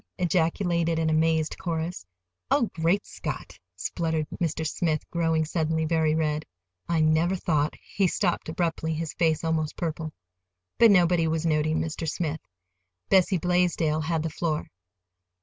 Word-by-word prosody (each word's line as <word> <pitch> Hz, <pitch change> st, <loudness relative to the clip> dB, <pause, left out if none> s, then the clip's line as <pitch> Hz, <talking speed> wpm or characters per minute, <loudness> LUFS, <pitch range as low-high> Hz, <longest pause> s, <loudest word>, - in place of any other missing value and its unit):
ejaculated 170 Hz, -1 st, +1 dB
an 160 Hz, -1 st, +1 dB
amazed 160 Hz, 0 st, +1 dB
chorus. 165 Hz, -, -3 dB, 0.4 s
"Oh, 240 Hz, -6 st, +2 dB
great 170 Hz, +5 st, +1 dB
Scott!" -, -, -6 dB, 0.2 s
spluttered 160 Hz, -, -2 dB, 0.2 s
Mr. 160 Hz, -1 st, 0 dB
Smith, 155 Hz, -1 st, -1 dB
growing 165 Hz, -2 st, +1 dB
suddenly 160 Hz, 0 st, 0 dB
very 160 Hz, -1 st, +2 dB
red. 155 Hz, -1 st, 0 dB, 0.5 s
"I 165 Hz, -2 st, +2 dB
never 160 Hz, +4 st, +3 dB
thought—" 155 Hz, -5 st, 0 dB, 0.2 s
He 195 Hz, -2 st, +3 dB
stopped 175 Hz, -3 st, -1 dB
abruptly, 160 Hz, -1 st, -1 dB
his 160 Hz, 0 st, -4 dB
face 160 Hz, -2 st, +1 dB
almost 160 Hz, -2 st, -1 dB
purple. 160 Hz, -1 st, -3 dB, 0.7 s
But 230 Hz, -, +8 dB
nobody 175 Hz, -4 st, +4 dB
was 160 Hz, +1 st, -1 dB
noticing 155 Hz, 0 st, +1 dB
Mr. 160 Hz, 0 st, -3 dB
Smith. 160 Hz, -2 st, -3 dB, 0.7 s
Bessie 190 Hz, 0 st, +4 dB
Blaisdell 170 Hz, -3 st, +1 dB
had 160 Hz, 0 st, -1 dB
the 160 Hz, -, -3 dB
floor. 155 Hz, -1 st, -2 dB
160 Hz, 135 wpm, -26 LUFS, 155-170 Hz, 0.7 s, But